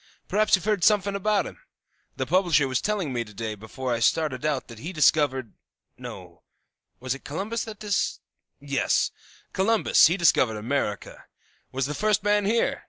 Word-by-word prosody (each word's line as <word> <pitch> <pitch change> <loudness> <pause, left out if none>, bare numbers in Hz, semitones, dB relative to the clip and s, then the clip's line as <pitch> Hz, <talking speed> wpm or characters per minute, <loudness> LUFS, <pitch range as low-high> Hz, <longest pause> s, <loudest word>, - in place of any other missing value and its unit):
Perhaps 215 +2 +3
you've 190 - -6
heard 210 -3 +1
sumfin' 205 -2 +3
about 205 +1 +1
him? - - -10 0.6
The - - -2
publisher 175 -7 +3
was 130 -1 -1
telling 200 -10 -2
me 120 -1 -1
to 105 -2 -15
day 110 +1 -4
before 120 +4 -5
I 115 - -1
started 150 +2 +1
out 145 -4 -1
that 115 -3 -11
he 165 +8 -6
discovered 145 - +2 0.4
no; - - -10 0.6
was 130 0 -2
it 135 - -10
Columbus 200 +10 -3
that 220 -2 -8
dis 205 -3 -1
oh, - - -57
yes, 140 -3 +1 0.4
Columbus 220 +3 +4
he 175 +4 0
discovered 130 - +3
America, 105 -2 -3 0.5
was 135 0 -1
the 145 - -3
first 210 +4 +1
man 205 0 +2
here. 230 +3 +1
155 Hz, 170 wpm, -25 LUFS, 130-205 Hz, 0.6 s, Columbus